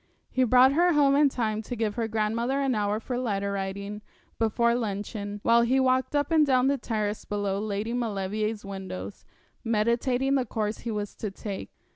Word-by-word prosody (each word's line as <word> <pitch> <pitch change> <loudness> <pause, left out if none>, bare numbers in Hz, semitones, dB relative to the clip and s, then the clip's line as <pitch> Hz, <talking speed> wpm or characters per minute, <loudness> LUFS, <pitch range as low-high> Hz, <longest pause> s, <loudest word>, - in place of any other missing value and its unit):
He 260 - +2
brought 255 +3 +6
her 350 +3 +4
home 280 -2 +4
in 290 0 +5
time 220 -4 -1
to 235 +3 -6
give 220 -2 -1
her 230 -1 -2
grandmother 225 +5 0
an 270 -2 +1
hour 210 -1 0
for 245 +2 -3
letter 200 -5 -1
writing 200 +1 -4 0.4
before 235 +1 +2
luncheon, 205 -2 -3
while 235 0 +5
he 250 +3 +2
walked 260 +2 +2
up 290 +2 +1
and 315 -2 +5
down 260 -3 +3
the 275 0 +2
terrace 215 -3 -2
below 205 -1 -2
Lady 210 +2 -2
Maulevrier's 215 -2 -2
windows, 190 - -7 0.4
meditating 235 +4 +1
the 270 -2 +2
course 215 -1 -2
he 235 - -5
was 210 -2 -3
to 215 - -3
take. 195 0 -6
225 Hz, 180 wpm, -27 LUFS, 205-255 Hz, 0.4 s, brought